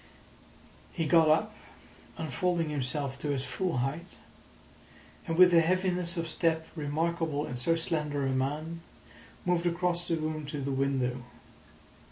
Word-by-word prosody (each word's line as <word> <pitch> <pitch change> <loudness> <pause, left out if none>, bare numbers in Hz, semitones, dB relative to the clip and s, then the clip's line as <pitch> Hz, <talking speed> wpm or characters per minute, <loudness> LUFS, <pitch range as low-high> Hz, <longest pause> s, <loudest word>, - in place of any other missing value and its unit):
He 165 - -1
got 160 0 +5
up, 155 - +3 0.6
unfolding 165 +2 -1
himself 135 0 -2
to 150 - -3
his 135 -2 0
full 140 +5 -2
height, 160 +6 -6 1.1
and 165 -1 -1
with 180 -1 +8
a 165 - +7
heaviness 180 0 0
of 165 0 -1
step 160 0 0
remarkable 155 0 -1
in 125 - -5
so 130 +7 +2
slender 150 -4 -1
a 135 - +1
man, 150 +6 -2 0.6
moved 175 -1 +2
across 175 0 0
the 165 - +1
room 155 -1 -3
to 145 0 -4
the 140 0 -2
window. 130 -2 0
160 Hz, 140 wpm, -30 LUFS, 140-170 Hz, 1.1 s, with